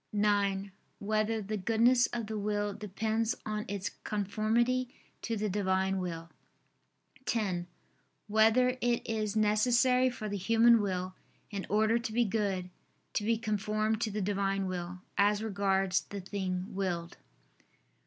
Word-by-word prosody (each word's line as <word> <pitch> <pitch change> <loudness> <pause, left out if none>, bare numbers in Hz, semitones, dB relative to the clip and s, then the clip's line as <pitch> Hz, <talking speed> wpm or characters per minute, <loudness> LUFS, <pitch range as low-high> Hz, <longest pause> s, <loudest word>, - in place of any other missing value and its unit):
(9) 200 -1 +1 0.3
Whether 215 +1 0
the 210 +2 -3
goodness 235 +4 +4
of 235 -2 -4
the 215 0 -4
will 205 0 -1
depends 220 +3 -1
on 215 0 -3
its 200 -1 -3
conformity 225 +5 0 0.3
to 230 -1 -2
the 210 +1 -1
Divine 190 -1 0
Will? 165 -2 -5 1.0
(10) 190 -7 -1 0.6
Whether 225 +4 +3
it 240 -1 0
is 215 -2 -1
necessary 245 +4 +3
for 235 -3 -6
the 205 -1 -3
human 230 +3 +5
will, 185 -2 -2 0.4
in 200 -2 -4
order 220 +3 +3
to 230 -1 -4
be 240 +1 +3
good, 195 -4 -1 0.4
to 210 - 0
be 225 +2 +2
conformed 215 0 -1
to 225 - 0
the 210 0 -3
Divine 195 0 0
Will, 180 -1 -5 0.2
as 205 +1 +3
regards 195 -3 +1
the 200 - -7
thing 185 -1 -4
willed? 180 -3 -3
210 Hz, 135 wpm, -31 LUFS, 195-225 Hz, 1.0 s, human